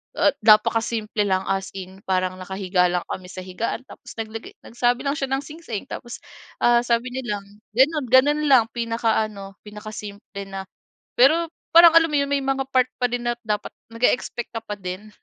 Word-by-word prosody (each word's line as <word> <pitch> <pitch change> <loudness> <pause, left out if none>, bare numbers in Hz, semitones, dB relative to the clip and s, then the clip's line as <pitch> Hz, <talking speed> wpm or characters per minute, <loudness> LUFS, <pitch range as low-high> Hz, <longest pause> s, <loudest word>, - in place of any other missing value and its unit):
ah, - - +4
napakasimple 215 -1 +3
lang, 190 -1 +1
as 195 0 -2
in. 190 0 -8
Parang 185 -1 0
nakahiga 185 -1 0
lang 175 0 -1
kami 185 -1 -5
sa 185 0 -8
higaan 205 +7 -4
tapos - - -13
naglagay 225 0 -7
nagsabi 240 +1 0
lang 280 - 0
siya 275 - -2
ng 270 - -1
singsing. 300 -8 -7
Tapos, 240 0 -7 0.4
ah, 240 0 +5
sabi 240 +1 0
niya 245 -5 -3
lang, 200 - -8 0.3
gano'n 290 +3 +3
gano'n 275 +5 +4
lang. 260 -4 +6
Pinaka-ano, 220 -4 -2
pinakasimple 210 -1 -8
na 195 0 -6 0.5
pero, 315 +7 +5 0.3
parang 335 0 +9
alam 330 0 +6
mo - - +2
'yong 280 0 0
may 280 -1 +1
mga 270 0 -1
part 255 -1 +4
pa 250 - +3
din 245 0 -3
na 240 0 0
dapat 210 -1 -2 0.2
nag-e-expect 240 0 0
ka 225 - -4
pa 210 - -4
din. 190 +2 -7
225 Hz, 175 wpm, -23 LUFS, 195-255 Hz, 0.5 s, parang